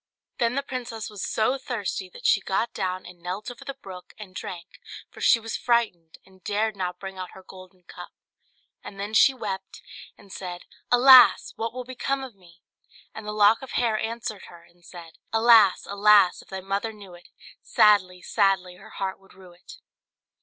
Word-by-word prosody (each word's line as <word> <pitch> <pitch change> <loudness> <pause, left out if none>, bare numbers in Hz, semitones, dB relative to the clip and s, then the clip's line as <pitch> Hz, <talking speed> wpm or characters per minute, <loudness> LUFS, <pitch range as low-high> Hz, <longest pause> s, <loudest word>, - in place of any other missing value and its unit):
Then 235 +1 +1
the 280 - -1
princess 235 -5 -6
was 205 -2 -7
so 250 +5 0
thirsty 205 -7 -4
that - - -13
she 200 - +4
got 195 +5 -2
down, 185 0 -3
and 180 0 -13
knelt 185 +6 -5
over 245 - -12
the 275 - -7
brook 190 -8 -12
and 205 -4 -11
drank, 175 -2 -9 0.3
for - - -13
she 230 - +5
was 225 0 -6
frightened, 215 -9 -1
and 190 -1 -23
dared 215 +1 -1
not 180 -2 -4
bring 195 -1 -8
out 185 -1 -7
her 190 - -13
golden 185 0 -15
cup; - - -11 0.7
and 195 - -10
then 205 +2 -5
she 270 - +6
wept, 195 -7 -7 0.3
and 200 -1 -15
said 180 -2 -7 0.3
"Alas! 255 +1 +7
what 230 +1 -3
will 255 +1 -6
become 265 +2 -3
of 260 -3 -9
me?" 175 -3 -22 0.5
And 220 -1 -9
the - - -3
lock 210 +1 +4
of 265 - -9
hair 235 -3 +1
answered 225 -2 -4
her, 170 -1 -15
and 175 +1 -26
said 170 -2 -13
"Alas! 225 -4 +5
alas! 200 -2 +4
if - - -21
thy 190 -1 -7
mother 200 +4 -3
knew 200 -4 -13
it, 175 0 -16 0.3
Sadly, 185 -4 +3
sadly 185 -2 0
her 210 +4 -15
heart 195 -3 -5
would 195 - -22
rue 185 -1 -15
it." 180 +3 -15
200 Hz, 190 wpm, -25 LUFS, 185-225 Hz, 0.7 s, Alas